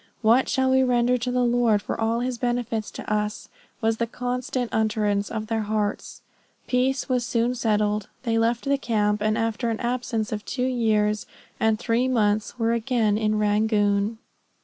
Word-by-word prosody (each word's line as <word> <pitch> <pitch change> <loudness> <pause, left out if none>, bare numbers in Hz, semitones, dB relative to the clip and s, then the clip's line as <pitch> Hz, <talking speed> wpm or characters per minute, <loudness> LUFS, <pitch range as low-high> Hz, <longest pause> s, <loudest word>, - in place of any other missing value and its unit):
"What 235 +4 +4
shall 265 -1 +2
we 265 0 +4
render 245 -1 +3
to 245 +2 -2
the 250 0 +1
Lord 240 -3 +3
for 205 - -5
all 225 +1 +1
his 250 -1 -3
benefits 240 -3 -1
to - - -9
us," 210 0 -2 0.3
was 225 0 +1
the 235 - -1
constant 250 0 -3
utterance 210 -2 0
of 220 -1 -4
their 225 0 -1
hearts. 210 -1 -3 0.4
Peace 255 +1 0
was 250 -2 +1
soon 235 +1 0
settled; 210 -3 0
they 225 -2 +1
left 230 +2 0
the 280 0 +1
camp, 210 -4 0
and 215 +1 +1
after 230 +1 -1
an 225 - -2
absence 240 -3 -2
of 210 -1 -3
two 250 -2 -2
years 215 -4 +1 0.3
and 220 0 +2
three 235 +2 +1
months 215 -3 +1
were 230 -1 +1
again 230 -3 +1
in 215 0 +1
Rangoon. 210 0 +1
225 Hz, 170 wpm, -24 LUFS, 215-245 Hz, 0.4 s, What